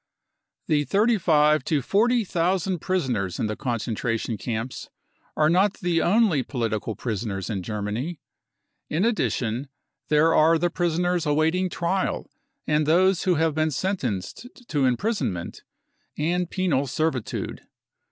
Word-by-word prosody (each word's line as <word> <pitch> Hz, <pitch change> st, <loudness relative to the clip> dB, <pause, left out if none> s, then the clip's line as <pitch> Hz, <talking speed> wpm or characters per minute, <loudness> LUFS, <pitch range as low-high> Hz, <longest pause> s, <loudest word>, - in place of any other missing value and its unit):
The 150 Hz, -1 st, +2 dB
thirty 215 Hz, +5 st, +2 dB
five 150 Hz, -3 st, +3 dB
to 145 Hz, -4 st, 0 dB
forty 235 Hz, -, +2 dB
thousand 180 Hz, +1 st, 0 dB
prisoners 125 Hz, -, -1 dB
in -, -, -1 dB
the 105 Hz, 0 st, -2 dB
concentration 115 Hz, -2 st, -2 dB
camps 115 Hz, +3 st, -5 dB, 0.5 s
are 150 Hz, -, +4 dB
not 185 Hz, +5 st, +3 dB
the 175 Hz, -2 st, 0 dB
only 195 Hz, -, +3 dB
political 115 Hz, -4 st, -3 dB
prisoners 105 Hz, -3 st, -3 dB
in 100 Hz, -3 st, -2 dB
Germany; 105 Hz, -, -4 dB, 0.7 s
in 170 Hz, +7 st, +1 dB
addition, 130 Hz, -, -1 dB, 0.4 s
there 155 Hz, +2 st, +4 dB
are 165 Hz, +1 st, +5 dB
the 175 Hz, +2 st, 0 dB
prisoners 175 Hz, -1 st, 0 dB
awaiting 160 Hz, +5 st, +2 dB
trial 180 Hz, +2 st, -2 dB, 0.3 s
and 150 Hz, 0 st, +1 dB
those 185 Hz, +3 st, +3 dB
who 180 Hz, -2 st, +3 dB
have 160 Hz, 0 st, +1 dB
been 155 Hz, +1 st, +1 dB
sen 190 Hz, +7 st, -1 dB
tenced 110 Hz, -, -4 dB, 0.2 s
to 145 Hz, -4 st, +1 dB
imprisonment 125 Hz, -, -1 dB, 0.6 s
and 175 Hz, +3 st, 0 dB
penal 155 Hz, -8 st, 0 dB
servitude. 135 Hz, -3 st, -2 dB
155 Hz, 130 wpm, -25 LUFS, 120-180 Hz, 0.7 s, are